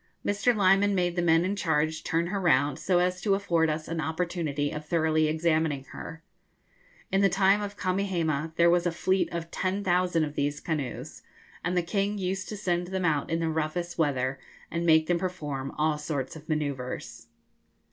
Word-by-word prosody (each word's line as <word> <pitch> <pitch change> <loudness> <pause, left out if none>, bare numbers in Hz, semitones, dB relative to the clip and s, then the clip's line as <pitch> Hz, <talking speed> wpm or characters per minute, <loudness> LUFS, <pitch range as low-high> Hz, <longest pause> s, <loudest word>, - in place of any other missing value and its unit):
Mr. 205 +4 +2
Lyman 200 0 +4
made 175 -2 +1
the 175 - +1
men 165 0 +4
in 195 +2 -1
charge 160 -3 0
turn 165 +1 0
her 200 - -1
round, 145 -5 +2
so 180 - +2
as 180 0 +1
to 200 -2 +2
afford 170 -5 +1
us 155 0 -3
an 165 -1 -2
opportunity 160 -3 -2
of 150 - -5
thoroughly 155 0 +2
examining 155 -3 +1
her. 165 0 -8 0.9
In 195 - +3
the 195 - +5
time 195 +3 +3
of 205 0 -5
Kamehameha 170 -5 -1
there 170 0 +5
was 175 0 +2
a - - +1
fleet 185 +3 0
of 170 -1 -5
10,000 185 -3 +1
of 150 -1 -3
these 145 0 -1
canoes, 150 -6 -4 0.4
and 180 +1 0
the 175 - +2
king 200 +3 -1
used 190 0 -3
to 210 - -5
send 175 -3 -1
them 190 0 -2
out 150 -4 +1
in 165 0 0
the 165 - 0
roughest 160 +3 -2
weather, 135 -3 0 0.3
and 170 +1 -1
make 160 -1 +5
them 175 +1 +1
perform 150 -7 -4
all 150 0 +1
sorts 150 -2 -3
of 155 0 -12
manoeuvres. 140 -5 -3
170 Hz, 185 wpm, -28 LUFS, 155-185 Hz, 0.9 s, the